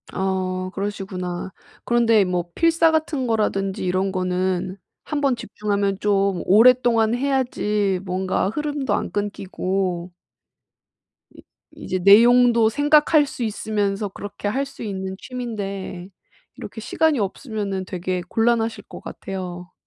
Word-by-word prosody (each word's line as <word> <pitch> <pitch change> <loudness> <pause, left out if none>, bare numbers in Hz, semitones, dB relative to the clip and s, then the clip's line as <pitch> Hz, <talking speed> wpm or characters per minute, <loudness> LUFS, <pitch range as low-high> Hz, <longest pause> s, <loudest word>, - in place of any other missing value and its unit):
아 185 -1 -2
그러시구나. 190 -3 -4 0.3
그런데 230 -3 +4
뭐 175 -1 -2
필사 330 0 +4
같은 310 -5 -1
거라든지 195 -4 -1
이런 185 +2 0
거는 185 0 -1 0.3
1 300 - -3
번 275 -3 +2
집중하면 205 -4 -2
좀 200 -3 +1
오랫동안 230 +1 +5
해야지 240 -7 0
뭔가 185 0 -1
흐름도 290 +2 -2
안 - - -2
끊기고 190 -3 -2 1.2
이 - - -15 0.3
이제 185 - -4
내용도 230 +4 +6
생각할 295 +3 +4
수 265 -3 -6
있으면서 210 -2 -1
그렇게 205 +1 -7
할 270 +6 -1
수 275 - -10
있는 190 -3 -4
취미인데 200 -7 -6 0.5
이렇게 220 - -8
시간이 310 +4 +1
없으면은 200 -2 -3
되게 180 0 -3
곤란하실 225 0 +1
것 - - -9
같아요. 180 -2 -7
205 Hz, 270 characters per minute, -22 LUFS, 190-240 Hz, 1.2 s, 내용도